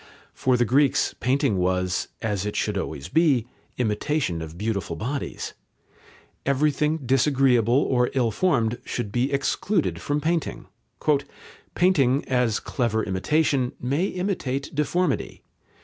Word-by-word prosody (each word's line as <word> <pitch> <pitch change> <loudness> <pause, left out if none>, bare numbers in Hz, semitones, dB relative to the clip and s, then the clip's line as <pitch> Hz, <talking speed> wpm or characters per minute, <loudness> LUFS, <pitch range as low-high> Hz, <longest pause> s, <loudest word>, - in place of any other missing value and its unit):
For 130 -1 +1
the 120 - +3
Greeks 135 +4 +2
painting 125 -5 +1
was, 90 0 0 0.2
as 105 -4 -1
it 105 0 -3
should 105 - -1
always 80 -7 -4
be, 145 -6 +3 0.3
"imitation 110 - -1
of 80 +1 -8
beautiful 100 -5 -2
bodies." 130 - -4 0.9
Everything 150 +2 +1
disagreeable 130 -3 +3
or 125 -1 +2
ill 120 -4 +2
formed 120 - +1
should 120 -5 -4
be 125 +5 0
excluded 160 +6 0
from 145 +1 -1
painting. 165 +1 -1 1.1
"Painting, 145 -7 +3
as 125 -4 +1
clever 115 -4 -1
imitation, 130 +6 +1
may 140 +9 0
imitate 180 -9 -3
deformity. 150 +1 -1
130 Hz, 115 wpm, -24 LUFS, 110-145 Hz, 1.1 s, the